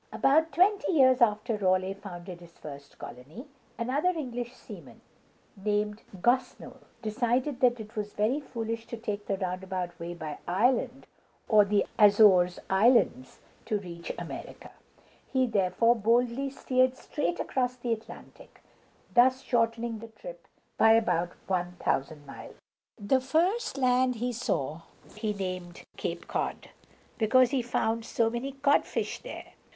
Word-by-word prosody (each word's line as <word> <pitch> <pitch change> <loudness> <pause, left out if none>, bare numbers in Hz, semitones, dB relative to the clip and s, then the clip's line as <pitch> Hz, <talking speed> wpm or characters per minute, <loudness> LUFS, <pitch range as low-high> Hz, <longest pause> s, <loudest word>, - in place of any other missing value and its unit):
About 315 +4 +3
twenty 375 +5 +2
years 260 -4 +5
after 215 0 +2
Raleigh 185 -1 +1
founded 180 -3 -9
his 170 -1 -16
first 140 -1 -11
colony, 145 - -10 0.3
another 270 +9 0
English 245 -8 -4
seaman, - - -12 0.5
named 210 +1 -1 0.2
Gos´nold, 245 +7 -1 0.2
decided 245 +5 0
that 245 -1 +3
it 215 0 -10
was 210 -1 -4
very 220 +8 +1
foolish 230 -4 -5
to 235 - -6
take 210 -2 -5
the 195 - -1
roundabout 185 -1 -4
way 170 +1 -5
by 155 -3 -6
Iceland 245 +7 +1 0.4
or 210 -2 +6
the 200 0 +2
Azores 200 -4 +6
Islands 195 - +2 0.2
to 215 - 0
reach 170 -4 -7
America. - - -8 0.6
He 260 -1 +3
therefore 230 +2 +2
boldly 240 +4 +1
steered 255 -1 +1
straight 340 +5 -3
across 250 -1 -1
the 240 -2 -2
Atlantic, 225 0 -11 0.5
thus 255 +2 +4
shortening 230 -1 0
the 230 - -9
trip - - -11 0.3
by 225 0 +7
about 175 -6 +1
one 180 -1 -1
thousand 145 -2 -2
miles. 135 - -11 0.4
The 235 +6 +2
first 335 - 0
land 255 -1 +2
he 245 +2 -2
saw 155 - -2 0.3
he 215 0 -2
named 185 -3 -5
Cape - - -5
Cod, - - -3 0.5
because 245 +3 +4
he 270 -3 +1
found 230 -1 -1
so 225 0 0
many 250 +4 -4
codfish 280 +1 0
there. - - -10
225 Hz, 135 wpm, -28 LUFS, 190-255 Hz, 0.6 s, by